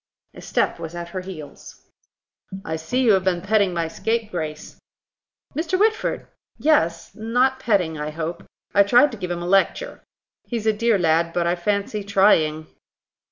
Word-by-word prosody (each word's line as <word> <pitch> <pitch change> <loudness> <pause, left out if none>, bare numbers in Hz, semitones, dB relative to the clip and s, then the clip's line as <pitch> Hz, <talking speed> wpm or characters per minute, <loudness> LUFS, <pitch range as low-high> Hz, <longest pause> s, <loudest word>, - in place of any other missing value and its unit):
A - - -12
step - - -1
was 165 +1 -7
at 170 0 -6
her 185 +1 -5
heels. 180 -6 -11 0.8
"I 160 - -2
see 205 +12 -1
you 235 - +5
have 190 -2 +3
been 180 -2 0
petting 200 -2 +2
my 170 -2 -1
scapegrace." 175 -6 -4 0.8
"Mr. 330 +4 0
Whitford! 435 +1 +1 0.3
Yes; 170 - +1
not 250 +4 +1
petting, 180 -10 0
I 150 0 -3
hope. 160 +2 -5 0.3
I 200 - +6
tried 245 +8 +5
to 230 - -8
give 180 - -4
him 175 0 -3
a - - -4
lecture. 195 - +1 0.5
He's 230 -3 -4
a 220 - +3
dear 230 0 +2
lad, 165 -1 +1
but, 175 -1 0
I 170 - +2
fancy, 200 +3 -2
trying." 180 -6 +3
190 Hz, 160 wpm, -22 LUFS, 170-225 Hz, 0.8 s, I